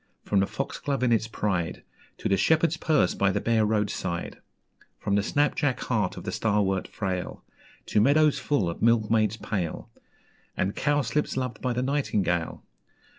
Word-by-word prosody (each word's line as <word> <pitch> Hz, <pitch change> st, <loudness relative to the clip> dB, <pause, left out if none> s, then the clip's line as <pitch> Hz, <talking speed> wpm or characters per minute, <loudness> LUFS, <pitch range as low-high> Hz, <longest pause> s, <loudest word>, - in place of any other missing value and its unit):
From 100 Hz, -, +1 dB
the 95 Hz, -, +2 dB
Foxglove 140 Hz, -3 st, -3 dB
in 125 Hz, -, +3 dB
its 110 Hz, -1 st, +2 dB
pride, 95 Hz, -6 st, -2 dB, 0.3 s
To -, -, -3 dB
the 100 Hz, -, +3 dB
Shepherd's 160 Hz, -, +3 dB
Purse 155 Hz, -2 st, +2 dB
by 100 Hz, -, +2 dB
the -, -, 0 dB
bare 110 Hz, -2 st, +2 dB
road 105 Hz, -1 st, +1 dB
side; 85 Hz, -2 st, -4 dB, 0.6 s
From 100 Hz, -, -2 dB
the 100 Hz, -, +3 dB
snap 145 Hz, +8 st, +1 dB
jack 145 Hz, -4 st, 0 dB
heart 105 Hz, -7 st, -1 dB
of -, -, -7 dB
the -, -, -4 dB
Starwort 100 Hz, -3 st, 0 dB
frail, 95 Hz, -4 st, -4 dB, 0.4 s
To 105 Hz, -, +2 dB
meadows 150 Hz, +5 st, +4 dB
full 130 Hz, -11 st, 0 dB
of 85 Hz, -, -5 dB
Milkmaids 110 Hz, -1 st, +3 dB
pale, 95 Hz, -8 st, -4 dB, 0.7 s
And 95 Hz, +2 st, -1 dB
Cowslips 145 Hz, -1 st, 0 dB
loved 125 Hz, -4 st, -3 dB
by 125 Hz, -1 st, 0 dB
the 125 Hz, +1 st, -1 dB
nightingale. 105 Hz, -, -1 dB
110 Hz, 165 wpm, -26 LUFS, 100-130 Hz, 0.7 s, meadows